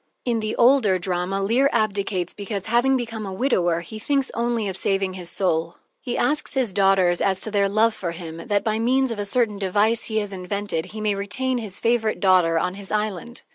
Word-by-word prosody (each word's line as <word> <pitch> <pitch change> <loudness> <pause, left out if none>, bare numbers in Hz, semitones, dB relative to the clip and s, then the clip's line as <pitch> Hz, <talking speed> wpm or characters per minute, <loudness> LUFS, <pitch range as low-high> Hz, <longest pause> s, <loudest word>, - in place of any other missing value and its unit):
In 235 -2 +1
the 215 0 -3
older 240 -6 +4
drama, 185 +2 -2
Leir 245 +7 +3
abdicates 200 -5 -1
because, 200 -1 -5
having 245 +4 +3
become 230 -3 -5
a 195 - -5
widower, 180 -6 +1
he 215 +6 -9
thinks 275 +3 0
only 235 -2 -1
of 190 - -3
saving 195 -1 0
his 180 -2 -3
soul. 165 -3 0 0.3
He 245 -2 -3
asks 295 -1 0
his 250 -7 0
daughters 195 -3 +3
as 190 -1 +1
to 215 - -2
their 200 -1 +2
love 220 +3 +3
for 185 -5 -4
him 165 -1 -7
that, 205 -2 +1
by 220 -1 0
means 260 +2 +2
of 225 - -4
a 205 - -2
certain 210 -1 +1
device 205 +4 +1
he 220 - -2
has 205 -2 -2
invented, 190 -2 -3
he 215 0 -8
may 210 -1 +1
retain 240 +6 -1
his 210 -5 -5
favorite 230 -2 +1
daughter 180 -4 +4
on 180 +2 0
his 195 0 -8
island. 215 +2 -3
205 Hz, 210 wpm, -23 LUFS, 190-230 Hz, 0.3 s, older